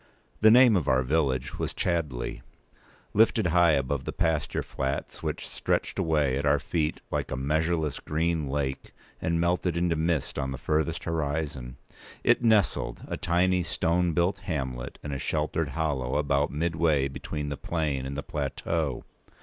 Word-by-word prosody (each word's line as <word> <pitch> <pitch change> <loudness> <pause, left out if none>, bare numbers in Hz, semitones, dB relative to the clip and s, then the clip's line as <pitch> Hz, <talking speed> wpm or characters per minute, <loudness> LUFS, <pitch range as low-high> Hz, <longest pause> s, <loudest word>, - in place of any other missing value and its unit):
The 110 - +7
name 120 -1 +7
of 85 -7 0
our 65 0 +3
village 65 -2 0
was - - -3
Chadleigh. 80 -9 -2 0.7
Lifted 110 -1 +4
high 85 -1 +4
above 70 -1 0
the - - -3
pasture 80 -2 0
flats 70 +1 -3
which - - -3
stretched - - -1
away 75 -5 +2
at - - -2
our 70 +1 +5
feet 75 +1 -2
like - - -1
a - - -2
measureless 80 +2 0
green 80 -1 -1
lake 70 -1 -3 0.3
and 85 0 0
melted 85 0 +1
into 85 -1 +1
mist 80 -2 -1
on 65 - -1
the 65 - -4
furthest 80 +4 -1
horizon, 75 -5 -3 0.5
it - - +3
nestled, 110 -5 +2
a - - -2
tiny 90 +1 +2
stone 85 0 +1
built 90 +4 +1
hamlet, 65 -10 -4
in 75 - -4
a 70 - -3
sheltered 75 +1 -1
hollow 70 -4 -1
about 70 0 +1
midway 80 -2 +1
between 75 +2 -5
the 70 - -3
plain 70 -4 -2
and 70 +1 -5
the 70 - -3
plateau. 80 -6 -2
75 Hz, 160 wpm, -27 LUFS, 70-85 Hz, 0.7 s, The